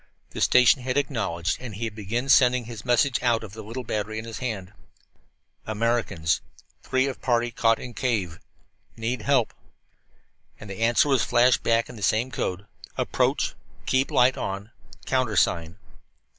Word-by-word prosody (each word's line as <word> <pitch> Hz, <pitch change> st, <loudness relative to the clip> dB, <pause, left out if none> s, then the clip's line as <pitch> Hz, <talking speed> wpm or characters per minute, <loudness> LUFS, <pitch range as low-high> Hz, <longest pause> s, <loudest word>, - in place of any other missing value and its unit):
The -, -, -6 dB
station 125 Hz, +1 st, +5 dB
had 130 Hz, +2 st, -2 dB
acknowledged, 95 Hz, -, -1 dB
and 120 Hz, -5 st, -7 dB
he 115 Hz, +3 st, -3 dB
began 110 Hz, +4 st, -4 dB
sending 125 Hz, -3 st, +4 dB
his 115 Hz, -2 st, -8 dB
message 125 Hz, +2 st, +2 dB
out 120 Hz, -3 st, +1 dB
of 100 Hz, -3 st, -9 dB
the 110 Hz, -, -8 dB
little 115 Hz, +4 st, -6 dB
battery 110 Hz, -1 st, -3 dB
in 110 Hz, -, -5 dB
his 115 Hz, -1 st, -7 dB
hand: 105 Hz, -7 st, -4 dB, 0.9 s
"Americans. 110 Hz, -7 st, 0 dB, 0.4 s
Three 130 Hz, 0 st, +1 dB
of 135 Hz, -2 st, -5 dB
party 120 Hz, -1 st, +1 dB
caught 115 Hz, -1 st, +2 dB
in 125 Hz, -, -8 dB
cave 105 Hz, -10 st, -2 dB, 0.6 s
in. -, -, -15 dB
Need 115 Hz, +1 st, -2 dB
help." 130 Hz, -2 st, +2 dB, 1.1 s
And 105 Hz, -1 st, -9 dB
the 95 Hz, -, -7 dB
answer 115 Hz, +5 st, +3 dB
was 135 Hz, -3 st, +3 dB
flashed 125 Hz, +1 st, +3 dB
back 115 Hz, 0 st, +2 dB
in -, -, -11 dB
the -, -, -10 dB
same 115 Hz, +6 st, +1 dB
code: 95 Hz, -2 st, -3 dB, 0.3 s
"Approach. -, -, 0 dB, 0.3 s
Keep 130 Hz, +1 st, +1 dB
light 125 Hz, +1 st, +3 dB
on. 100 Hz, +3 st, -5 dB, 0.3 s
Countersign." 100 Hz, -9 st, +1 dB
115 Hz, 160 wpm, -25 LUFS, 105-125 Hz, 1.1 s, station